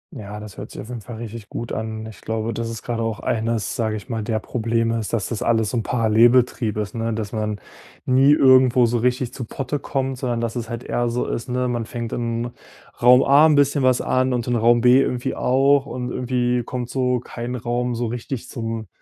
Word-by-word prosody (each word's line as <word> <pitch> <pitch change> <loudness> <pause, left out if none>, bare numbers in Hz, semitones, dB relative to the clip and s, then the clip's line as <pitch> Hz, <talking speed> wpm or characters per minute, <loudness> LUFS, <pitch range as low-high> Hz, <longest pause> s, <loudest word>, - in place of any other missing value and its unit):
Ja, 105 0 -7
das 105 -2 -10
hört - - -7
sich - - -10
auf 110 - -8
jeden 120 -2 -6
Fall 120 +2 -9
richtig 115 -2 -8
gut 120 - -5
an. 110 0 -4
Ich 110 -4 -11
glaube, 110 +1 -2
das 115 +1 -3
ist 115 -1 -7
grade 120 -1 -3
auch 115 -1 -2
eines, 115 -3 -1
sage 110 -2 -1
ich 105 - -8
mal, 115 -2 -2
der 110 +1 -1
Probleme 115 0 -1
ist, 110 - -5
dass 115 -4 -1
das 115 - -4
alles 115 -2 +1
so 125 - -1
'n - - +1
Parallelbetrieb 115 0 +3
ist, 105 -1 -3
ne, 115 0 -2
dass 105 -2 -4
man 105 -2 -2 0.5
nie 135 +2 +5
irgendwo 130 -3 +6
so 120 +1 0
richtig 125 +1 0
zu 130 - -5
Potte 140 +5 -4
kommt, 135 -2 -2
sondern 120 -3 -1
dass 115 0 -3
es 115 -2 -4
halt 120 0 -5
eher 120 0 -1
so 120 +1 -1
ist, 115 +2 -4
ne, 125 0 0
man 120 -2 -2
fängt 120 -2 -5
in 120 0 -2 0.5
Raum 125 +2 +7
A 145 +3 +6
'n 155 - +4
bisschen 140 0 +3
was 130 -1 +3
an 130 0 +1
und 120 -2 -1
in 120 - +1
Raum 120 +1 +4
B 125 +2 +6
irgendwie 125 -2 -1
auch 135 +2 +3
und 125 -1 -4
irgendwie 125 -1 0
kommt 120 0 -5
so 125 -1 +1
kein 120 +1 -6
Raum 120 +1 -2
so 120 +1 -2
richtig 120 +2 -5
zum 115 -2 -4
120 Hz, 225 wpm, -22 LUFS, 115-125 Hz, 0.5 s, Raum